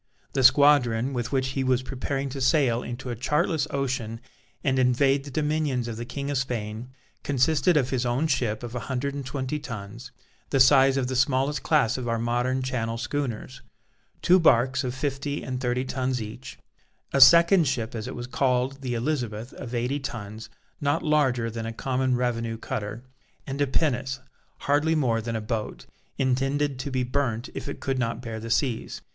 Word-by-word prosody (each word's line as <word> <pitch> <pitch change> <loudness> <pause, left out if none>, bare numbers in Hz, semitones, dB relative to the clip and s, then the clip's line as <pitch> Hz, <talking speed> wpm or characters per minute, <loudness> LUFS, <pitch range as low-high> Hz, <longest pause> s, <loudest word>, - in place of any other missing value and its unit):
The 135 - +1
squadron, 130 -3 +5
with 120 -1 -3
which 130 -1 +1
he 135 0 -1
was 130 -1 +1
preparing 135 +1 -3
to 135 +1 -6
sail 130 -4 +3
into 120 +1 -6
a - - -3
chartless 150 - 0
ocean 130 -5 -2 0.4
and 130 -2 +1
invade 135 +2 +3
the - - -7
dominions 150 -4 0
of 115 - -4
the 120 - -5
King 140 +3 -4
of 140 - +1
Spain, 115 -2 -4 0.3
consisted 145 +4 +2
of 130 -3 +1
his 130 -2 0
own 125 +5 0
ship, 120 -7 0
of 120 -1 -6
a 125 - -2
hundred 135 +2 -1
and 140 0 -4
twenty 135 +2 -3
tons, 115 -1 -8 0.4
the 135 - +1
size 135 0 +6
of 135 - +1
the 130 +1 -3
smallest 135 +2 +1
class 135 -5 +2
of 125 - -4
our 115 0 0
modern 120 +3 0
Channel 115 -3 -2
schooners, 130 0 -4 0.6
two 185 +1 +6
barques 130 -4 +3
of 125 0 -3
fifty 140 +1 -3
and 130 0 -4
thirty 125 0 0
tons 130 -1 -1
each, 110 +3 -8 0.6
a 135 - +3
second 170 +5 +8
ship 120 -4 -2
as 110 -2 -5
it - - -6
was 120 - -5
called, 130 +1 0
the 125 -2 -2
Elizabeth, 120 -3 -2
of 125 -2 -7
eighty 125 +4 -1
tons, 110 -5 -7 0.3
not 145 +3 +1
larger 135 -7 +2
than 115 0 -5
a - - -3
common 130 +2 0
revenue 115 -2 -1
cutter, 110 +1 -5 0.4
and 140 -1 -4
a 145 - +3
pinnace, 130 -2 0 0.4
hardly 145 +3 +2
more 120 -7 +1
than 115 +1 -4
a 110 - -2
boat, 105 0 -4 0.3
intended 135 +1 0
to 130 - -3
be 130 -1 0
burnt 125 -2 -2
if - - -5
it - - -6
could 135 -1 -2
not 115 -2 -1
bear 115 -2 -5
the 115 +1 -7
seas. 115 0 -1
130 Hz, 185 wpm, -26 LUFS, 120-140 Hz, 0.6 s, second